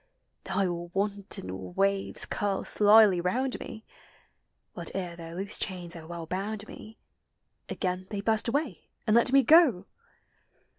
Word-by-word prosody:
Thy 190 0 0
wanton 180 - -3
waves 195 0 +1
curl 200 -2 -2
slyly 210 -3 +5
round 255 +9 -1
me; 220 - -9 0.9
But - - -2
ere 180 -3 -4
their 165 0 -9
loose 195 +3 -3
chains 180 -3 -4
have 165 -2 -10
well 170 -1 -7
hound 205 +3 -3
me, 220 +1 -12 0.7
Again 185 -1 -3
they 205 -2 -4
burst 220 +2 +1
away 265 - -2 0.2
and 215 -1 +2
Id 235 +1 +4
me 275 0 +5
go! 260 - +5
195 Hz, 135 wpm, -28 LUFS, 180-220 Hz, 0.9 s, slyly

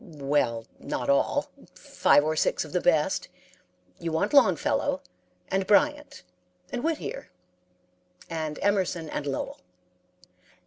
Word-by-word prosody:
"'Well, 140 -7 -1
not 125 +2 -1
all. 140 - +1 0.2
Five 145 - +3
or 155 +1 0
six 155 - +1
of 155 - -11
the 180 - 0
best; 155 -4 +2 0.7
you 165 - -3
want 160 - 0
Longfellow, 225 - +3 0.5
and 190 0 0
Bryant, 295 - +2 0.5
and 245 - -3
Whittier, 320 -1 -3 1.0
and 155 -2 -4
Emerson, 185 -5 0
and 145 - -3
Lowell.' 135 - -4
160 Hz, 115 wpm, -27 LUFS, 150-200 Hz, 1.0 s, Five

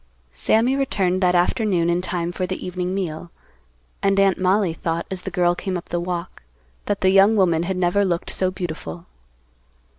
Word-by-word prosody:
Sammy 225 - +2
returned 195 -9 0
that 180 -1 +3
afternoon 175 -1 +1
in 175 +1 +1
time 175 -1 -2
for 185 +1 -3
the 185 - -5
evening 180 0 -3
meal, 175 -3 -4 0.7
and 195 0 +2
Aunt 195 -2 +3
Mollie 190 -1 +2
thought, 165 +1 -3
as 190 -1 -4
the 190 - -5
girl 175 -1 +2
came 185 +1 -3
up 175 - -10
the 175 - -1
walk, 175 0 -5 0.5
that 205 -1 -1
the 190 - +4
young 195 +3 +5
woman 175 -5 +3
had 185 +2 -2
never 185 +3 +2
looked 175 -3 -1
so 185 - +1
beautiful. 155 - -6
180 Hz, 180 wpm, -22 LUFS, 175-195 Hz, 0.7 s, young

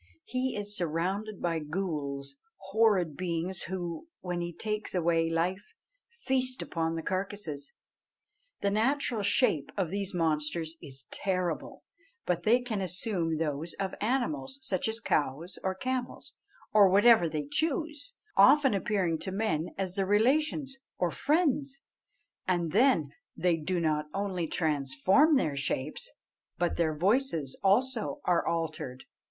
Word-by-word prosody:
He 255 +1 -1
is 205 0 -4
surrounded 185 +4 -2
by 165 -2 +1
ghools, 150 -4 -3 0.4
horrid 200 -8 +3
beings 175 +1 -2
who, 175 - -4
when 175 -1 -3
he 175 0 -3
takes 210 +3 -3
away 165 -1 +2
life, 180 - -2 0.3
feast 260 - 0
upon 165 -1 -2
the 165 - -4
carcasses. 185 -7 -3 0.9
The 200 - +1
natural 240 +1 +1
shape 200 - +2
of 185 -5 0
these 200 0 -2
monsters 160 -1 -1
is 135 -1 -5
terrible; 185 -3 -2 0.4
but 175 -1 0
they 235 +7 +4
can 225 -5 -3
assume 180 -3 -1
those 155 +1 -2
of 195 -1 -3
animals, 265 +4 -1
such 270 0 -1
as 220 +1 -2
cows 155 - -1
or 190 0 0
camels, 255 +4 -3 0.4
or 205 -2 +7
whatever 205 -2 +6
they 150 -2 -3
choose, 305 - -2 0.2
often 270 +7 +6
appearing 190 -5 0
to 190 - -4
men 180 -5 -1
as 190 -2 -2
their 195 -1 -1
relations 270 +6 +2 0.2
or 175 -2 +1
friends, 280 - +1 0.7
and 175 -3 +1
then 205 - +3 0.3
they 180 -2 +3
do 175 +3 -2
not 155 -2 0
only 190 -4 -1
transform 155 - +3
their 155 - +1
shapes, 140 +1 -2 0.5
but 175 0 0
their 160 -2 +1
voices 185 - +1
also 245 +7 +2
are 175 -2 +3
altered. 155 -6 -3
185 Hz, 135 wpm, -30 LUFS, 165-225 Hz, 0.9 s, or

